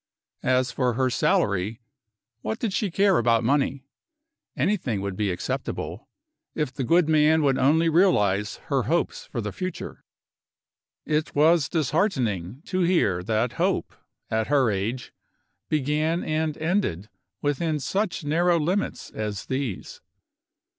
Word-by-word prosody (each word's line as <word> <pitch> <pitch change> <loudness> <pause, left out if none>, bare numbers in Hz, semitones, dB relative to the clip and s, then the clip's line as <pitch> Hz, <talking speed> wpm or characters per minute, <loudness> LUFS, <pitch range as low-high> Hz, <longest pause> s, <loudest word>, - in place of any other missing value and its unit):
As 130 0 +1
for 125 -2 0
her 130 +2 +1
salary, 100 0 +1 0.6
what 220 - -3
did 225 -5 -2
she 205 0 0
care 195 +1 +3
about 115 0 +3
money? 135 +1 +1 0.7
Anything 155 - 0
would 100 -1 -3
be 105 0 0
acceptable, 90 -1 -4 0.5
if 150 -4 -2
the 130 - -3
good 170 +5 +3
man 155 0 +4
would 135 -2 +2
only 160 +5 +4
realize 105 - +3 0.2
her - - +2
hopes - - -1
for - - -4
the - - -4
future. 185 0 -6 1.0
It 155 0 -1
was 155 +1 +4
disheartening 130 - -1
to 185 - -2
hear 170 - +2
that 110 +4 0
hope, - - 0 0.4
at 110 0 0
her 135 -5 +3
age, 110 +6 -3 0.6
began 155 +3 0
and 155 -1 -1
ended 160 - -1 0.4
within 150 +2 0
such 190 +6 -2
narrow 170 +3 +2
limits 180 +7 -2
as 105 -3 -4
these. 130 -7 -4
145 Hz, 130 wpm, -25 LUFS, 115-165 Hz, 1.0 s, man